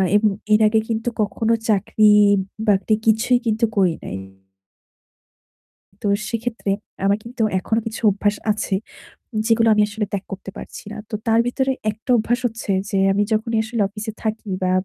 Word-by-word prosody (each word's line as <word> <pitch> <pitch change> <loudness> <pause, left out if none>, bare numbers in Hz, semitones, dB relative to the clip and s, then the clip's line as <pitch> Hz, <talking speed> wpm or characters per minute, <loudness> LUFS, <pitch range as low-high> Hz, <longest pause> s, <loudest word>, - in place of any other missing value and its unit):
এবং 210 0 +4 0.2
এর 210 - +5
আগে 220 +1 +3
কিন্তু 225 +1 -1
কখনো 220 +3 0 0.2
চাকরি-বাকরি 205 0 +3
কিছুই 225 +3 +4
কিন্তু 225 +1 +2
করি 185 -4 +4
নাই। 95 - -5 1.8
তো 205 - -1 0.2
সেক্ষেত্রে 230 -2 -3 0.4
আমার 200 +1 +3
কিন্তু 235 0 -6 0.2
এখনও 225 +4 0
কিছু 225 - -6
অভ্যাস 205 +1 0 0.2
আছে 205 -2 -1 0.7
যেগুলো 230 -1 +4
আমি 210 - +4
আসলে 210 0 -3
ত্যাগ 200 -1 -2
করতে 195 0 -6
পারছি - - -9
না। - - -8
তো - - -5
তার 225 0 +4
ভেতরে 265 +2 0 0.2
একটা 220 +5 -8
অভ্যাস 240 +2 0
হচ্ছে 225 -2 -5 0.2
যে 195 - -1 0.2
আমি 205 +1 +2
যখনই 220 +1 0
আসলে 220 -1 -1
অফিসে 215 +1 -6
থাকি 220 -1 -3
বা 185 - +1
215 Hz, 155 wpm, -21 LUFS, 205-225 Hz, 1.8 s, এর